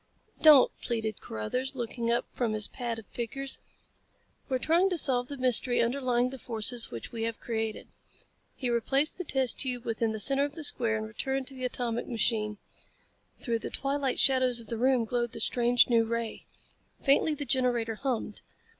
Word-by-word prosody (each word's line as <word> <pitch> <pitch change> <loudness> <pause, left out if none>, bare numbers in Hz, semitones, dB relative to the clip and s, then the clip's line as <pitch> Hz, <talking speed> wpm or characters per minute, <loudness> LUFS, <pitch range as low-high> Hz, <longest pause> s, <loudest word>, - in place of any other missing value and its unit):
"Don't," 300 -5 +8
pleaded 220 -3 -3
Carruthers, 250 - -4
looking 235 -1 -3
up 235 - +1
from 235 -3 -1
his 215 -1 0
pad 240 -3 -4
of 225 - -9
figures. 270 +5 -4 0.9
"We're 260 - +1
trying 335 +8 +2
to 360 - -1
solve 250 -5 +2
the 285 - -6
mystery 250 -1 +4
underlying 250 0 +1
the 265 - -8
forces 230 +1 +1
which 115 -1 -8
we 230 - -5
have 230 0 -3
created." 225 -2 -4 0.7
He 250 -2 -2
replaced 270 +8 0
the - - -2
test 265 -6 +1
tube 250 -3 -1
within 225 0 -1
the 220 - -4
center 275 +6 +5
of 290 0 -3
the 320 - -6
square 235 -6 +1
and 215 - -4
returned 265 +5 -3
to - - -12
the 255 -1 -4
atomic 240 -2 -2
machine. 215 -2 0 0.8
Through 230 -3 -1
the - - -5
twilight 275 -1 -1
shadows 255 -3 +3
of 230 - -12
the 230 - -3
room 255 -1 +3
glowed 240 +1 -2
the - - -4
strange 240 0 +3
new 230 -2 +3
ray. 230 0 -4 0.6
Faintly 295 +2 +3
the 290 - -5
generator 245 -3 +1
hummed. 235 -3 -3
245 Hz, 180 wpm, -29 LUFS, 230-265 Hz, 0.9 s, Don't